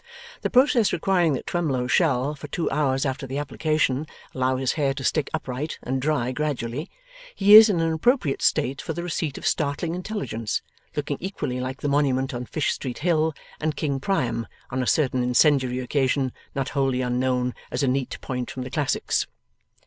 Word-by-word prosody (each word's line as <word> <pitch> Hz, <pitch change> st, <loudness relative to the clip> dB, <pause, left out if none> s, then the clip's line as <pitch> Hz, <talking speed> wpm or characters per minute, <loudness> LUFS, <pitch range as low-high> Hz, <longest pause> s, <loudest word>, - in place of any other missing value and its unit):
The -, -, -1 dB
process 250 Hz, -4 st, +4 dB
requiring 175 Hz, -3 st, +2 dB
that 130 Hz, -, -4 dB
Twemlow 145 Hz, -8 st, -1 dB
shall, 140 Hz, -1 st, +2 dB
for 150 Hz, 0 st, -9 dB
two 165 Hz, +3 st, -2 dB
hours 135 Hz, -2 st, +1 dB
after 135 Hz, 0 st, -3 dB
the 135 Hz, +2 st, -4 dB
application, 150 Hz, -1 st, 0 dB, 0.3 s
allow 130 Hz, 0 st, +1 dB
his 130 Hz, 0 st, 0 dB
hair 140 Hz, -3 st, 0 dB
to 135 Hz, -, -5 dB
stick 150 Hz, +1 st, +1 dB
upright 130 Hz, +5 st, -4 dB
and 130 Hz, +1 st, -2 dB
dry 135 Hz, -4 st, 0 dB
gradually, 145 Hz, +1 st, -3 dB, 0.5 s
he 200 Hz, +1 st, +5 dB
is 220 Hz, +1 st, +11 dB
in 185 Hz, -5 st, +1 dB
an 165 Hz, 0 st, +1 dB
appropriate 160 Hz, -, +1 dB
state 135 Hz, +2 st, +1 dB
for 160 Hz, -, -4 dB
the 170 Hz, +2 st, -4 dB
receipt 160 Hz, -4 st, -2 dB
of -, -, -8 dB
startling 155 Hz, +2 st, 0 dB
intelligence; 175 Hz, -, -3 dB, 0.3 s
looking 145 Hz, -1 st, -2 dB
equally 180 Hz, -9 st, -3 dB
like 130 Hz, +1 st, -4 dB
the -, -, -1 dB
Monument 135 Hz, -2 st, +1 dB
on 120 Hz, 0 st, -5 dB
Fish 155 Hz, -, 0 dB
Street 125 Hz, -3 st, -5 dB
Hill, 160 Hz, -2 st, +1 dB, 0.2 s
and 155 Hz, -1 st, -1 dB
King 140 Hz, -3 st, -1 dB
Priam 125 Hz, -, -1 dB, 0.2 s
on 130 Hz, +1 st, -1 dB
a 125 Hz, -, -2 dB
certain 130 Hz, -4 st, +2 dB
incendiary 125 Hz, 0 st, +3 dB
occasion 130 Hz, 0 st, 0 dB, 0.2 s
not 135 Hz, -1 st, -1 dB
wholly 135 Hz, -2 st, 0 dB
unknown 125 Hz, 0 st, 0 dB, 0.2 s
as 125 Hz, -, -2 dB
a -, -, +2 dB
neat 130 Hz, 0 st, -1 dB
point 125 Hz, -1 st, -4 dB
from 130 Hz, -, -5 dB
the 125 Hz, -, -7 dB
classics. 145 Hz, -4 st, 0 dB
140 Hz, 180 wpm, -24 LUFS, 130-155 Hz, 0.5 s, is